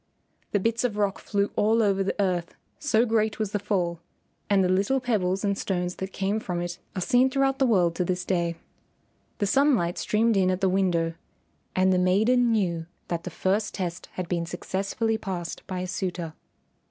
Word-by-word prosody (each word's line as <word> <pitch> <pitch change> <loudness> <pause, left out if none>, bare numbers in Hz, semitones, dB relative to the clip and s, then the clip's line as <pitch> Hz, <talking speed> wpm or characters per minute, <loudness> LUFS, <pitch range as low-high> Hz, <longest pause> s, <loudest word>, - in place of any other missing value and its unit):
The 205 - +2
bits 230 +4 0
of 225 -4 -1
rock 205 -2 0
flew 200 -1 -1
all 225 +2 +3
over 195 -2 +2
the 195 - -3
earth 180 -3 0 0.2
so 245 -6 +3
great 220 -2 +1
was 215 -2 -2
the 205 - 0
fall, 180 -4 -1 0.5
and 200 -2 +4
the - - +3
little 195 +9 +2
pebbles 200 -6 0
and 200 -1 +1
stones 180 -2 -2
that 190 0 -5
came 200 +3 -1
from 180 -5 -3
it 175 0 -4 0.2
are 185 - -2
seen 250 +5 +4
throughout 270 0 +1
the 265 - +4
world 180 -7 +3
to 180 - +2
this 180 0 -2
day. 170 -2 0 0.8
The 205 - 0
sunlight 225 -7 +2
streamed 220 0 +2
in 185 -1 +3
at 185 0 0
the 190 -1 +2
window, 175 -3 +1 0.6
and 185 0 +4
the 180 - +3
maiden 220 +7 +3
knew 170 -7 0 0.2
that 170 -1 -3
the - - -3
first 195 +5 -1
test 180 -2 -4
had 185 -2 -4
been 170 -1 -1
successfully 200 +5 -2
passed 180 -5 -4
by 185 -2 -3
a 185 - -3
suitor. 180 -3 -3
195 Hz, 190 wpm, -26 LUFS, 180-220 Hz, 0.8 s, and